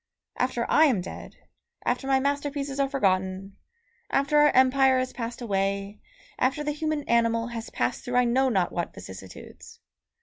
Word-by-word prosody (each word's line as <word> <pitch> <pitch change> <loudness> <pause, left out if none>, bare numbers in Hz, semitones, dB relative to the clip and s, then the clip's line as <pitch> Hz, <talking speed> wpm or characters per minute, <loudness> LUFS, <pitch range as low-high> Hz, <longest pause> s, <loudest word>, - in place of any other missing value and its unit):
after 250 -2 -1
I 315 - +5
am 255 -10 +2
dead, 180 - -8 0.5
after 270 - -1
my 270 -1 +3
masterpieces 280 0 -2
are 275 -1 +2
forgotten, 190 -5 -1 0.5
after 280 +2 +2
our 295 0 +6
Empire 260 0 +4
has 255 0 -2
passed 235 0 -5
away, 200 -1 -2 0.4
after 270 +4 +1
the 295 - -1
human 305 0 -2
animal 230 -1 +1
has 230 -1 -6
passed 120 +1 -2
through 245 - -4
I 250 0 +4
know 260 +3 +2
not 190 -7 +1
what 175 - -4
vicissitudes. 95 0 -11
250 Hz, 160 wpm, -26 LUFS, 200-275 Hz, 0.5 s, our